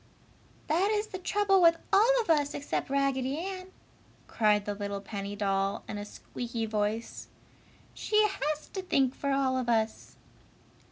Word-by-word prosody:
"That 350 Hz, +6 st, +2 dB
is 425 Hz, 0 st, +1 dB
the 375 Hz, -, -6 dB
trouble 390 Hz, +1 st, +2 dB
with 335 Hz, -1 st, +6 dB, 0.2 s
all 475 Hz, +5 st, +5 dB
of 435 Hz, -, -8 dB
us 290 Hz, -2 st, +2 dB
except 285 Hz, -, -3 dB
Raggedy 275 Hz, 0 st, 0 dB
Ann!" 370 Hz, +2 st, -5 dB, 0.6 s
cried 210 Hz, -2 st, +2 dB
the 205 Hz, -, -2 dB
little 200 Hz, 0 st, -4 dB
penny 200 Hz, 0 st, -6 dB
doll, 195 Hz, -1 st, 0 dB
in 210 Hz, -, -5 dB
a 205 Hz, -, -5 dB
squeaky 230 Hz, +2 st, -5 dB
voice, 215 Hz, +1 st, -2 dB, 0.7 s
"She 425 Hz, -, +1 dB
has 305 Hz, -6 st, -3 dB
to 385 Hz, -, -4 dB
think 270 Hz, -8 st, +1 dB
for 280 Hz, -, -3 dB
all 270 Hz, -1 st, +1 dB
of 245 Hz, -2 st, -3 dB
us!" 220 Hz, -1 st, -1 dB
270 Hz, 155 wpm, -29 LUFS, -, 0.7 s, with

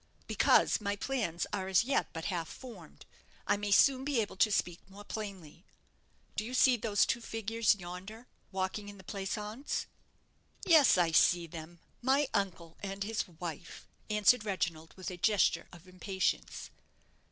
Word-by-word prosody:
"Because -, -, +3 dB
my 200 Hz, -1 st, -1 dB
plans 205 Hz, -7 st, -2 dB
are 190 Hz, -1 st, -2 dB
as 190 Hz, +2 st, +4 dB
yet 275 Hz, +3 st, +1 dB
but 165 Hz, 0 st, -6 dB
half 165 Hz, -2 st, -3 dB
formed. 215 Hz, -, -12 dB, 0.4 s
I 205 Hz, -, +3 dB
may 205 Hz, 0 st, -3 dB
soon 260 Hz, +6 st, +5 dB
be 280 Hz, -3 st, 0 dB
able 210 Hz, -, -2 dB
to 210 Hz, +2 st, +4 dB
speak 175 Hz, -3 st, 0 dB
more 200 Hz, +2 st, -12 dB
plainly. 195 Hz, -8 st, -7 dB, 0.7 s
Do -, -, -1 dB
you 245 Hz, +3 st, -5 dB
see 255 Hz, 0 st, +5 dB
those 215 Hz, -3 st, +2 dB
two 235 Hz, -, -1 dB
figures 225 Hz, 0 st, +1 dB
yonder, 190 Hz, +5 st, -9 dB, 0.3 s
walking 195 Hz, +2 st, -3 dB
in 200 Hz, -, -11 dB
the 190 Hz, -, -14 dB
pleasaunce?" 210 Hz, +7 st, -4 dB, 0.8 s
"Yes, 310 Hz, -, +6 dB
I 170 Hz, -2 st, +3 dB
see 170 Hz, +2 st, +4 dB
them 165 Hz, +1 st, -10 dB, 0.2 s
my 270 Hz, +3 st, +3 dB
uncle 175 Hz, -4 st, -2 dB
and 195 Hz, 0 st, -4 dB
his 220 Hz, +1 st, -2 dB
wife," 165 Hz, -3 st, -8 dB, 0.2 s
answered 210 Hz, +2 st, +4 dB
Reginald, 165 Hz, -6 st, -3 dB
with 185 Hz, -1 st, -5 dB
a 180 Hz, -, -7 dB
gesture 185 Hz, -3 st, +2 dB
of 175 Hz, 0 st, -15 dB
impatience. 185 Hz, +1 st, -3 dB
200 Hz, 155 wpm, -32 LUFS, 175-225 Hz, 0.8 s, Yes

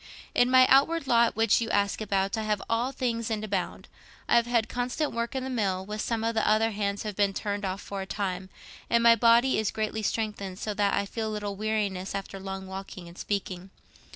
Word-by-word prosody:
"In 245 Hz, 0 st, +4 dB
my 255 Hz, 0 st, +7 dB
outward 280 Hz, +5 st, +4 dB
lot, 235 Hz, -2 st, +3 dB
which 225 Hz, 0 st, +3 dB
you 230 Hz, -, -2 dB
ask 200 Hz, 0 st, +1 dB
about, 195 Hz, -1 st, 0 dB
I 220 Hz, -, -2 dB
have 210 Hz, -1 st, 0 dB
all 235 Hz, +3 st, 0 dB
things 235 Hz, -4 st, -2 dB
and 215 Hz, -1 st, -2 dB
abound. 200 Hz, -4 st, -3 dB, 0.4 s
I -, -, +3 dB
have 235 Hz, 0 st, +4 dB
had 235 Hz, -2 st, +1 dB
constant 250 Hz, +5 st, -2 dB
work 235 Hz, +2 st, -3 dB
in 260 Hz, -, -2 dB
the 265 Hz, -, -4 dB
mill, 195 Hz, -6 st, -1 dB
though 210 Hz, +2 st, -5 dB
some 225 Hz, +1 st, -2 dB
of 230 Hz, 0 st, 0 dB
the 220 Hz, -, +1 dB
other 220 Hz, +1 st, +3 dB
hands 200 Hz, -1 st, -2 dB
have 210 Hz, -2 st, -5 dB
been 200 Hz, -1 st, +1 dB
turned 205 Hz, -1 st, -3 dB
off 190 Hz, +1 st, -3 dB
for 200 Hz, -1 st, -5 dB
a 190 Hz, -, -6 dB
time, 190 Hz, -2 st, -3 dB, 0.4 s
and 235 Hz, 0 st, +3 dB
my 230 Hz, 0 st, +8 dB
body 235 Hz, +3 st, +4 dB
is 220 Hz, -, 0 dB
greatly 220 Hz, 0 st, -2 dB
strengthened, 210 Hz, -3 st, -3 dB
so 210 Hz, +1 st, -3 dB
that 200 Hz, -1 st, +1 dB
I 200 Hz, -, 0 dB
feel 220 Hz, +2 st, -4 dB
little 205 Hz, -2 st, -4 dB
weariness 205 Hz, -3 st, -2 dB
after 195 Hz, 0 st, -5 dB
long 190 Hz, 0 st, -6 dB
walking 190 Hz, -2 st, -8 dB
and 170 Hz, -, -12 dB
speaking. 190 Hz, -2 st, -4 dB
215 Hz, 220 wpm, -27 LUFS, 195-230 Hz, 0.4 s, my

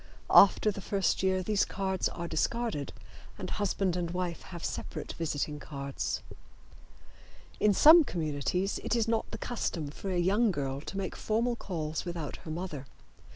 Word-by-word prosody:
After 200 Hz, +2 st, +7 dB
the 200 Hz, -, -7 dB
first 195 Hz, +1 st, 0 dB
year 190 Hz, 0 st, +1 dB
these 210 Hz, +1 st, +2 dB
cards 190 Hz, -2 st, -1 dB
are 170 Hz, 0 st, -5 dB
discarded, 230 Hz, -9 st, -1 dB, 0.5 s
and -, -, -5 dB
husband 195 Hz, -3 st, 0 dB
and 175 Hz, -2 st, -2 dB
wife 180 Hz, -1 st, -3 dB
have 175 Hz, -3 st, -7 dB
separate -, -, -5 dB
visiting 150 Hz, -2 st, -2 dB
cards. 140 Hz, -2 st, -4 dB, 1.4 s
In 210 Hz, -, +4 dB
some 315 Hz, -, +8 dB
communities 170 Hz, -, -1 dB
it -, -, 0 dB
is 230 Hz, -1 st, +1 dB
not 225 Hz, -1 st, 0 dB
the -, -, -6 dB
custom 170 Hz, -11 st, -3 dB
for 195 Hz, -, -6 dB
a 185 Hz, -, 0 dB
young 200 Hz, +6 st, +3 dB
girl 140 Hz, -6 st, -2 dB
to 195 Hz, -, -7 dB
make 195 Hz, -2 st, -3 dB
formal 235 Hz, +3 st, 0 dB
calls 160 Hz, -8 st, -4 dB
without 170 Hz, -5 st, -5 dB
her -, -, -11 dB
mother. 155 Hz, -5 st, -5 dB
185 Hz, 155 wpm, -30 LUFS, 155-205 Hz, 1.4 s, some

